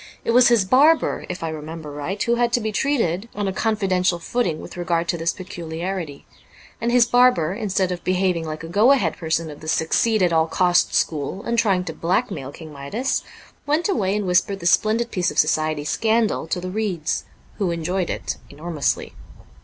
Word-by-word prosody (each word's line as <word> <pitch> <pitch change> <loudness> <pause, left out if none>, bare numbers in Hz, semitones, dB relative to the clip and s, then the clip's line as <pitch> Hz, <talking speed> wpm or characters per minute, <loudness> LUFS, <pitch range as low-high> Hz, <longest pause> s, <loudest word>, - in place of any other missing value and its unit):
It - - +1
was 245 +1 +6
his 235 -5 +4
barber 290 +9 +3
(if 180 -2 -5
I 165 - -2
remember 155 0 -7
right) 150 +8 -3
who 235 - +1
had 240 0 +1
to 245 - +3
be 220 -1 -2
treated 225 - 0
on 205 -1 -2
a 190 - -1
confidential 190 -5 +1
footing 170 -3 -1
with - - -10
regard 170 -1 -1
to - - +1
this 165 +1 +1
peculiarity; 170 -3 -6 0.6
and 235 +1 0
his 245 -1 +5
barber, 245 -9 +3
instead 195 -3 -1
of 175 -1 -5
behaving 180 -2 +1
like 155 0 -6
a - - -6
go 210 +10 +5
ahead 195 - 0
person 160 -1 -2
of 145 - -11
the 155 - -11
succeed 190 +7 +2
at 175 -2 +2
all 160 0 +3
costs 175 +1 +2
school 155 +5 -1
and 235 0 0
trying 195 -5 +2
to 165 - -6
blackmail 170 - -1
King 155 0 -11
Midas, 145 - -2 0.5
went 305 +4 +1
away 200 - 0
and 210 -1 -1
whispered 185 +2 +1
this 170 -1 +2
splendid 230 +2 +2
piece 180 -1 0
of - - -8
society 155 -1 +1
scandal 220 +4 +1
to 180 - -1
the 185 +1 -5
reeds, 185 -6 -2 0.3
who 195 -3 +1
enjoyed 170 +2 -2
it - - -3
enormously. 150 0 -2
185 Hz, 195 wpm, -22 LUFS, 165-220 Hz, 0.6 s, was